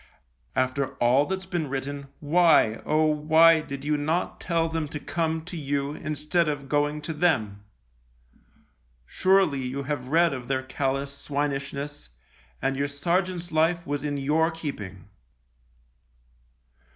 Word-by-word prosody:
After 130 Hz, +1 st, 0 dB
all 125 Hz, +4 st, +3 dB
that's 190 Hz, 0 st, -3 dB
been 175 Hz, -6 st, -2 dB
written, 140 Hz, +1 st, -4 dB
why, 150 Hz, -8 st, +4 dB
oh! 155 Hz, +1 st, +3 dB
why 160 Hz, +2 st, +5 dB
did 140 Hz, -2 st, -7 dB
you 150 Hz, 0 st, +1 dB
not 160 Hz, +5 st, -1 dB
tell 165 Hz, -2 st, +1 dB
them 160 Hz, -1 st, -2 dB
to 150 Hz, +1 st, -6 dB
come 160 Hz, 0 st, -2 dB
to 180 Hz, -, -7 dB
you 140 Hz, -2 st, -2 dB
instead 155 Hz, +2 st, -1 dB
of 145 Hz, -2 st, -4 dB
going 145 Hz, +1 st, 0 dB
to 160 Hz, -, -3 dB
them? 110 Hz, -, 0 dB, 1.4 s
Surely 185 Hz, -, +2 dB
you 130 Hz, +2 st, -3 dB
have 135 Hz, -2 st, -3 dB
read 165 Hz, +3 st, +3 dB
of 125 Hz, -2 st, -6 dB
their 130 Hz, 0 st, -1 dB
callous 135 Hz, +1 st, -2 dB
swinishness, 140 Hz, -, -4 dB, 0.5 s
and 135 Hz, -, +1 dB
your 140 Hz, +1 st, 0 dB
sergeant's 175 Hz, +4 st, -1 dB
life 165 Hz, +2 st, +2 dB
was 145 Hz, -2 st, -3 dB
in 145 Hz, -1 st, -2 dB
your 155 Hz, +4 st, +2 dB
keeping 105 Hz, -, -7 dB
145 Hz, 135 wpm, -26 LUFS, 140-160 Hz, 1.4 s, why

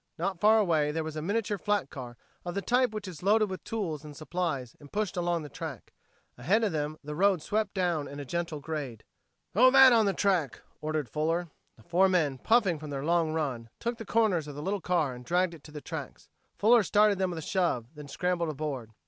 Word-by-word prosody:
Not 180 Hz, +1 st, -2 dB
far 215 Hz, +3 st, +6 dB
away 165 Hz, -8 st, +2 dB
there 160 Hz, +1 st, -2 dB
was 155 Hz, -1 st, -6 dB
a 155 Hz, -, -3 dB
miniature 205 Hz, +3 st, -1 dB
flat 205 Hz, -8 st, 0 dB
car 120 Hz, -3 st, -8 dB, 0.3 s
of 175 Hz, 0 st, -5 dB
the 200 Hz, -, -1 dB
type 250 Hz, +1 st, +3 dB
which 215 Hz, -2 st, -6 dB
is 170 Hz, -5 st, -8 dB
loaded 210 Hz, +1 st, +3 dB
with 185 Hz, -, -6 dB
tools 170 Hz, -10 st, -3 dB
and 150 Hz, -2 st, -10 dB
supplies 155 Hz, -7 st, -3 dB
and 145 Hz, -1 st, -15 dB
pushed 205 Hz, -2 st, -2 dB
along 175 Hz, -2 st, 0 dB
the -, -, -7 dB
track. 145 Hz, -3 st, -8 dB, 0.5 s
Ahead 195 Hz, -, +2 dB
of 210 Hz, -, +1 dB
them 155 Hz, 0 st, -2 dB
the 150 Hz, +1 st, -6 dB
road 185 Hz, 0 st, +2 dB
swept 215 Hz, 0 st, -1 dB
down 175 Hz, -6 st, 0 dB
in 145 Hz, -, -8 dB
a 145 Hz, -, -6 dB
gentle 170 Hz, +1 st, -3 dB
grade. 140 Hz, -6 st, -5 dB, 0.5 s
"Throw 250 Hz, +6 st, +7 dB
that 265 Hz, -1 st, +8 dB
on 225 Hz, -3 st, +4 dB
the 195 Hz, -, +2 dB
track," 180 Hz, -, 0 dB, 0.2 s
ordered 155 Hz, -3 st, -2 dB
Fuller. 165 Hz, +4 st, -1 dB, 0.3 s
The -, -, -19 dB
four 180 Hz, +3 st, +3 dB
men, 155 Hz, -8 st, +1 dB
puffing 200 Hz, -, +3 dB
from 155 Hz, 0 st, -8 dB
their 140 Hz, 0 st, -4 dB
long 165 Hz, -1 st, +2 dB
run, 130 Hz, -8 st, -3 dB
took 235 Hz, 0 st, -3 dB
the -, -, -5 dB
corners 205 Hz, -9 st, +2 dB
of 145 Hz, -, -8 dB
the 145 Hz, -, -6 dB
little 195 Hz, +2 st, -1 dB
car 160 Hz, -6 st, 0 dB
and 125 Hz, 0 st, -10 dB
dragged 175 Hz, +4 st, +1 dB
it 155 Hz, -4 st, -13 dB
to 150 Hz, -, -12 dB
the 150 Hz, -1 st, -8 dB
tracks. -, -, -7 dB, 0.3 s
Fuller 230 Hz, +3 st, +5 dB
started 205 Hz, 0 st, +3 dB
them 190 Hz, -1 st, +1 dB
with 175 Hz, -, -5 dB
a -, -, -4 dB
shove, 175 Hz, -, 0 dB
then 150 Hz, -2 st, -10 dB
scrambled 175 Hz, +1 st, -1 dB
aboard. 140 Hz, -6 st, -4 dB
170 Hz, 225 wpm, -29 LUFS, 150-200 Hz, 0.5 s, that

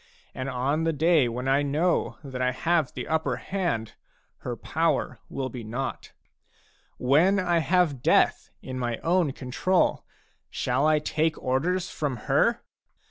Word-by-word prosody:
And 130 Hz, +1 st, -4 dB
on 140 Hz, +5 st, 0 dB
the 165 Hz, 0 st, +1 dB
day 155 Hz, -3 st, +3 dB
when 125 Hz, +3 st, -4 dB
I 135 Hz, +2 st, +3 dB
know 150 Hz, +5 st, 0 dB
that 130 Hz, -2 st, -6 dB
I 125 Hz, 0 st, +2 dB
have 160 Hz, +2 st, +1 dB
the -, -, -6 dB
upper 155 Hz, -5 st, 0 dB
hand, 145 Hz, -, -2 dB, 0.5 s
her -, -, -4 dB
power -, -, -1 dB
will 130 Hz, -1 st, -3 dB
be 125 Hz, -3 st, -7 dB
naught. 125 Hz, +5 st, -5 dB, 0.9 s
When 160 Hz, +10 st, +3 dB
I 175 Hz, -2 st, +2 dB
have 165 Hz, -6 st, +1 dB
death -, -, +3 dB
in 130 Hz, -1 st, -5 dB
my 120 Hz, -2 st, -2 dB
own 170 Hz, -3 st, +2 dB
control, 135 Hz, +9 st, 0 dB, 0.5 s
shall 150 Hz, -, 0 dB
I 155 Hz, 0 st, +4 dB
take 155 Hz, +1 st, 0 dB
orders 170 Hz, +8 st, -1 dB
from 145 Hz, -4 st, -2 dB
her? -, -, +2 dB
145 Hz, 145 wpm, -26 LUFS, 130-170 Hz, 0.9 s, I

